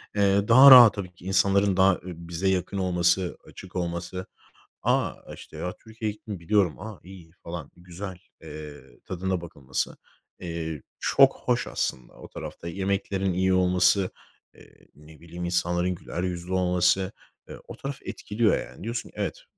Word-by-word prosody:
Eee, 100 0 +3
daha 130 +4 +9
rahat 125 -4 +11
tabii 90 -3 -6
ki 85 - -17
insanların 95 0 +2
daha, 95 0 +6
eee, - - -5
bize 85 +1 -5
yakın 95 +1 0
olması, 90 -1 +1
açık 95 - -12
olması. 90 +1 -4 0.6
A, - - +1 0.2
işte, - - -12
ya, 90 - -4
Türkiye'ye 110 -1 -4
gittim 105 -3 -9
biliyorum. 90 -2 +1
A, 105 -2 -8
iyiydi 90 -3 -14
falan, 85 -4 -7
güzel. 90 +1 -8 0.2
Eee, 75 -5 -11
tadına 95 0 -2
bakılması, 70 -6 -4 0.4
eee, 80 -4 -5 0.2
çok - - +4
hoş - - +1
aslında. 60 -1 -3
O - - -12
tarafta 85 - -8
yemeklerin 95 +1 -1
iyi 95 +1 +2
olması, 90 +1 +3 0.4
eee, - - -20
ne 75 +1 -17
bileyim 85 +1 -8
insanların 90 +1 0
güler 90 0 -6
yüzlü 90 0 -4
olması, 90 +1 +2 0.4
eee, - - -8
o - - -8
taraf 140 0 -6
etkiliyor 105 0 0
yani. - - -14
Diyorsun 115 +1 -4
ki - - -22
evet, - - -3
90 Hz, 155 wpm, -26 LUFS, 85-100 Hz, 0.6 s, rahat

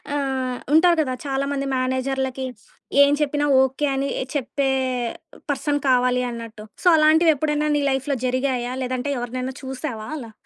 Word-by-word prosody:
ఆహ్, 265 -3 -1 0.2
ఉంటారు 340 +1 +5
కదా 260 -4 -1
చాలా 275 0 -1
మంది 275 -1 -2
మేనేజర్లకి 260 0 -1 0.6
ఏం 280 - +4
చెప్పినా 290 0 +1 0.2
ఓకే 265 +3 -1
అని 275 +1 -1 0.3
చెప్పే 275 0 -1 0.8
పర్సన్ 285 +1 -1
కావాలి 250 0 +3
అన్నట్టు. 230 -2 -8 0.2
సో, - - +2
అలాంటివెప్పుడైనా 305 -1 +3
నీ 290 - 0
లైఫ్‌లో 270 +1 -1
జరిగాయా? 255 -1 -1
లేదంటే 255 +2 -2
ఎవరినైనా 255 +2 -4
చూసావా 260 -4 -5
అలా 230 -6 -8
265 Hz, 130 wpm, -22 LUFS, 255-290 Hz, 0.8 s, ఉంటారు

